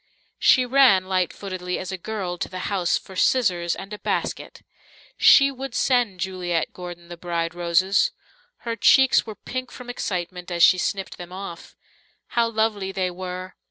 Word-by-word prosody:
She 255 - +5
ran, 245 -7 +5
light 185 -2 0
footedly 185 -2 -5
as 185 - -5
a - - -2
girl, 185 -3 -4
to - - -3
the 185 0 -6
house 180 -3 +1
for 190 - -12
scissors 180 -7 +2
and 195 +2 -9
a 210 - -7
basket. - - -3 0.5
She 275 -1 +6
would 265 -2 -7
send 245 -8 +1
Juliet 175 -2 -2
Gordon 175 -1 -9
the 175 0 -9
bride 170 -1 -2
roses. 175 - +2 0.6
Her 230 -1 -2
cheeks 265 0 +5
were 215 - -6
pink 255 +3 -6
from 245 -1 -8
excitement 180 -5 -4
as 170 -1 +1
she 185 +2 +6
snipped 195 +1 -3
them 175 0 -9
off. 185 -2 -8 0.5
How 235 -1 +1
lovely 220 -3 -1
they 185 -1 -1
were! 185 0 -6
185 Hz, 165 wpm, -23 LUFS, 175-220 Hz, 0.6 s, She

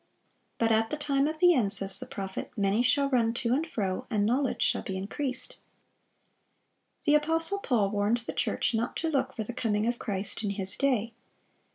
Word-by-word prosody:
But 230 -1 +1
at 225 0 +2
the 300 - -3
time 285 -1 +1
of 310 +1 -3
the 355 +2 +5
end, 225 -9 +1
says 195 -1 +4
the - - -7
prophet, 190 -1 -6
"many 200 +2 +1
shall 280 +3 +2
run 235 -4 +1
to 235 0 0
and 310 +5 0
fro, 195 -9 -3
and 210 -4 +1
knowledge 255 +4 0
shall - - +2
be 190 - -5
increased."(591) 255 +7 -7
The 295 - +4
apostle 325 +5 +2
Paul 220 - 0
warned 205 +3 +1
the 235 - -6
church - - 0
not 230 +2 -2
to 325 - -1
look 265 -2 -1
for 220 - -3
the 245 - -7
coming 215 -3 -1
of 240 +1 -1
Christ 200 0 -2
in 205 - -1
his 195 -1 +2
day. 240 -5 0
235 Hz, 195 wpm, -28 LUFS, 205-275 Hz, -, the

